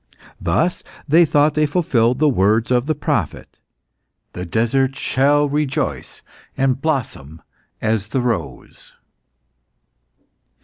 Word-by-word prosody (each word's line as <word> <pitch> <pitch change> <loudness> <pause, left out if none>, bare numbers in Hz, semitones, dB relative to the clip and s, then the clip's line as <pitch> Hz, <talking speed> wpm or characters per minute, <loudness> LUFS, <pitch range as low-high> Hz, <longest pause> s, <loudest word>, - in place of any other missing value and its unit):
Thus, 160 - 0 0.3
they 165 +4 +5
thought 150 0 +2
they 155 0 +1
fulfilled 125 -7 +1
the 155 +2 +3
words 110 -1 +2
of 125 +2 +1
the 155 - 0
prophet, 145 - -3 0.7
"The 90 0 -6
desert 130 +7 0
shall 145 +2 +2
rejoice 140 - -3 0.3
and 135 -1 0
blossom 115 - -3 0.4
as 110 -2 0
the 130 +4 -1
rose." 120 -2 -5
135 Hz, 105 wpm, -19 LUFS, 110-145 Hz, 0.7 s, they